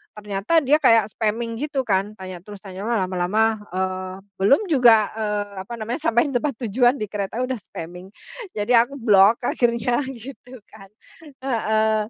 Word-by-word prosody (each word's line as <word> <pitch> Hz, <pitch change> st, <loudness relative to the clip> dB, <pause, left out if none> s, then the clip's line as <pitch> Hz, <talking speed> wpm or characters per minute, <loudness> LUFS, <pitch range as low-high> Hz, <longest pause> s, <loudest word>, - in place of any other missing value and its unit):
ternyata 210 Hz, +10 st, 0 dB
dia 300 Hz, +3 st, +4 dB
kayak 225 Hz, -2 st, +5 dB
spamming 230 Hz, +1 st, -2 dB
gitu, 280 Hz, -3 st, -2 dB
kan. 200 Hz, +1 st, -1 dB
Tanya 185 Hz, -2 st, -8 dB
terus, 205 Hz, +2 st, -11 dB
tanya, 190 Hz, -1 st, -8 dB
wah, 235 Hz, -, +1 dB
lama-lama, 210 Hz, +5 st, 0 dB
eee 185 Hz, 0 st, -3 dB, 0.3 s
belum 210 Hz, -, +5 dB
juga, 230 Hz, -6 st, +5 dB
eee, 210 Hz, -2 st, -3 dB
apa 195 Hz, +5 st, -9 dB
namanya, 230 Hz, +6 st, -4 dB
sampai 240 Hz, +6 st, +2 dB
di 275 Hz, -, -6 dB
tempat 295 Hz, -2 st, -1 dB
tujuan, 245 Hz, +4 st, +3 dB
di 215 Hz, -, -3 dB
kereta 205 Hz, +3 st, -4 dB
udah 260 Hz, 0 st, -3 dB
spamming. 180 Hz, 0 st, -9 dB, 0.5 s
Jadi 210 Hz, +4 st, 0 dB
aku 240 Hz, +3 st, +4 dB
blok, 215 Hz, -2 st, +5 dB
akhirnya, 240 Hz, +1 st, +1 dB, 0.2 s
gitu 255 Hz, +1 st, -11 dB
kan, 195 Hz, -2 st, -16 dB, 0.6 s
heeh. 220 Hz, -3 st, +1 dB
220 Hz, 160 wpm, -22 LUFS, 195-240 Hz, 0.6 s, kayak